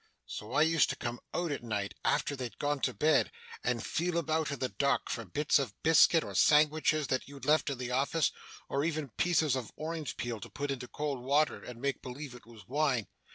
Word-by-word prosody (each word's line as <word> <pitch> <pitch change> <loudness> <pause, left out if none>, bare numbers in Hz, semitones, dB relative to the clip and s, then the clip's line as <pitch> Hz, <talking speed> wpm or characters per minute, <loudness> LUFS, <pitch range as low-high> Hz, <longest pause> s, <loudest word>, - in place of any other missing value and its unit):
So 105 - -7
I 150 - +5
used 160 -2 +3
to - - -1
come 120 0 -4
out 175 -3 -1
at 145 - -3
night 105 -3 -2
after 145 - +1
they'd 125 -3 -6
gone 145 0 0
to - - 0
bed, 155 +1 +3 0.3
and 120 -2 -1
feel 175 +1 -1
about 160 -1 0
in 140 - -3
the 130 -1 -1
dark 140 0 0
for 115 - -3
bits 145 +11 +2
of 125 -8 -3
biscuit, 160 +1 +6
or - - -7
sangwitches 155 0 +4
that 130 - 0
you'd 140 -1 -10
left 155 +1 +3
in 140 - -3
the 125 0 -4
office, 140 +5 +2 0.4
or 140 - 0
even 155 -3 -1
pieces 155 +2 +2
of 125 -4 -4
orange 155 -3 -4
peel 120 -2 -3
to 115 - -9
put 140 +6 -3
into 125 -2 -4
cold 145 -3 -3
water 145 +4 +2
and 125 -1 -9
make 140 0 -1
believe 130 +1 -7
it 125 -2 -13
was 110 -4 -14
wine. 135 -5 +1
140 Hz, 215 wpm, -31 LUFS, 125-155 Hz, 0.4 s, biscuit